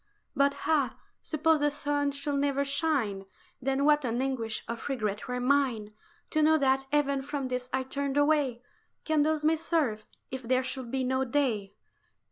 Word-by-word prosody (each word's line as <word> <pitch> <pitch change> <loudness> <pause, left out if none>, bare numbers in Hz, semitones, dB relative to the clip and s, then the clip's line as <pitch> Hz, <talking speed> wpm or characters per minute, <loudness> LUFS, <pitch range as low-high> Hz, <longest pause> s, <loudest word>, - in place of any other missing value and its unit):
"But 280 +1 +3
ah! 295 -4 +2 0.3
suppose 315 0 +2
the 295 0 +3
sun 290 0 -1
should 280 0 -2
never 280 0 +1
shine, 275 -9 0 0.4
Then 270 +2 +1
what 300 -1 +4
an 240 -1 -1
anguish 250 -5 -2
of 235 +4 -5
regret 215 -6 -2
were 250 0 -2
mine 250 -5 +1 0.4
To 310 - +2
know 315 +1 +5
that 270 -1 +2
even 280 -2 +2
from 280 -1 -4
this 250 0 -3
I 260 0 0
turned 280 +1 -3
away! 290 -5 +2 0.4
Candles 310 0 +2
may 320 +1 +4
serve, 300 -10 -1 0.2
if 260 0 -4
there 255 +1 +1
should 260 -2 -5
be 265 +1 -1
no 260 +1 +1
day." 235 -7 -1
275 Hz, 165 wpm, -29 LUFS, 250-290 Hz, 0.4 s, know